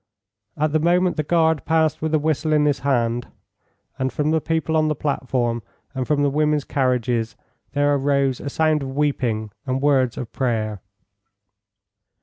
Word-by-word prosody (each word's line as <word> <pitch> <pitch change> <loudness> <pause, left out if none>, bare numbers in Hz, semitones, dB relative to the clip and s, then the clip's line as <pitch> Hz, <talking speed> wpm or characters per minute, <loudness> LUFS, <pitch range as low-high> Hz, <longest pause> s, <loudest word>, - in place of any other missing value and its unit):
At 155 0 +1
the 155 - +2
moment 175 +3 +2
the - - 0
guard 160 -1 +2
passed 160 -2 +1
with 160 0 -1
a - - +5
whistle 155 +1 0
in 150 -1 +3
his 145 -2 +1
hand, 120 -3 0 0.7
and 130 0 0
from 150 +1 0
the 160 0 +2
people 160 0 -1
on 155 0 +3
the 155 - 0
platform 125 -5 -1 0.3
and 130 -2 -3
from 145 -1 +2
the 140 - +2
women's 150 0 +1
carriages 125 -4 0 0.4
there 145 0 +2
arose 140 -2 +1
a 140 - -5
sound 155 +1 +1
of 135 -1 -5
weeping 120 -7 -1 0.2
and 130 +1 0
words 135 -4 +2
of 120 - -6
prayer. 110 -5 -1
145 Hz, 165 wpm, -22 LUFS, 130-155 Hz, 0.7 s, a